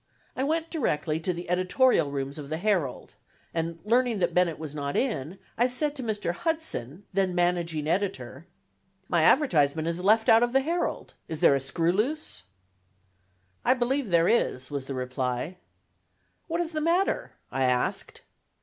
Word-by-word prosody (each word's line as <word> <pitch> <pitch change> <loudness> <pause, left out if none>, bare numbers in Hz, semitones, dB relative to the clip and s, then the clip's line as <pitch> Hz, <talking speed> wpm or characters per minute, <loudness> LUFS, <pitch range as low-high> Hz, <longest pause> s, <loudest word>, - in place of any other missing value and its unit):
I 260 - -1
went 320 +3 -1
directly 155 - -1
to 175 +3 -1
the 175 0 -6
editorial 185 - +3
rooms 140 +1 -4
of 140 -1 -8
the 160 - -2
Herald; 180 -8 -1 0.4
and 165 0 -2
learning 240 0 +2
that 185 - 0
Bennett 180 -3 +2
was 155 -2 -7
not 140 -1 -3
in, 190 - -2 0.2
I 245 - +5
said 290 +4 -1
to 270 - -5
Mr. 210 -7 -2
Hudson, 205 - -3
then 190 -2 +1
managing 175 -3 0
editor: 165 -5 -2 0.6
"My 170 -2 +2
advertisement 160 - +3
is 170 +1 -2
left 220 +3 +4
out 225 - +7
of 240 0 +1
the 270 - +4
Herald; 335 +5 -2
is 160 -2 -5
there - - +6
a 140 - +2
screw 165 +6 0
loose?" 230 - -2 1.2
"I - - +4
believe 255 0 0
there 170 -1 +4
is," 130 - +1
was 140 -2 -4
the 135 - -5
reply. 130 +5 -3 0.9
"What 335 0 -1
is 335 -1 -3
the 310 -1 -2
matter?" 345 +5 +1 0.2
I 135 -1 +1
asked. 125 -1 -1
180 Hz, 165 wpm, -27 LUFS, 150-245 Hz, 1.2 s, out